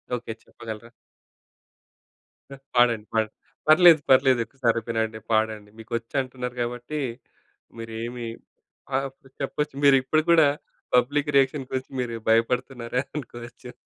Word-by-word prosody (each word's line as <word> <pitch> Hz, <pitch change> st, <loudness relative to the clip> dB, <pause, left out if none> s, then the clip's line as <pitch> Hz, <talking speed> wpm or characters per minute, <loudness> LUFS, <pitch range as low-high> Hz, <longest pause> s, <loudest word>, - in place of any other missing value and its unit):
Okay. 120 Hz, -2 st, -5 dB
చెప్పగలరా? 110 Hz, 0 st, -9 dB, 1.9 s
పాడండి. 120 Hz, -3 st, +4 dB
పాడ్ 110 Hz, -1 st, +1 dB, 0.4 s
పర్లేదు, 160 Hz, 0 st, +8 dB
పర్లేదు. 130 Hz, -2 st, +5 dB
ఒకసారి 120 Hz, -4 st, 0 dB
వినిపీయండి 110 Hz, -1 st, -1 dB
పాడండి. 110 Hz, -1 st, 0 dB
మీకొచ్చంటున్నారు 125 Hz, +2 st, -4 dB
కాబట్టి, 120 Hz, +5 st, -4 dB, 0.8 s
మీరు 115 Hz, 0 st, -7 dB
ఏమి 120 Hz, 0 st, -5 dB, 0.7 s
ఆహ్, 135 Hz, 0 st, 0 dB
ప్ 135 Hz, -, -19 dB
చెప్పచ్చు. 150 Hz, +1 st, -2 dB
మీరిప్పుడు 140 Hz, +2 st, +4 dB
కూడా 160 Hz, -3 st, +7 dB, 0.5 s
పబ్లిక్ 145 Hz, +4 st, +2 dB
రియాక్షన్ 135 Hz, 0 st, +2 dB
గురించి 130 Hz, 0 st, -4 dB
మీరు 120 Hz, -2 st, -2 dB, 0.2 s
భయపడుతున్నారనుకోవచ్చు. 125 Hz, +1 st, -2 dB
125 Hz, 100 wpm, -25 LUFS, 115-135 Hz, 1.9 s, పర్లేదు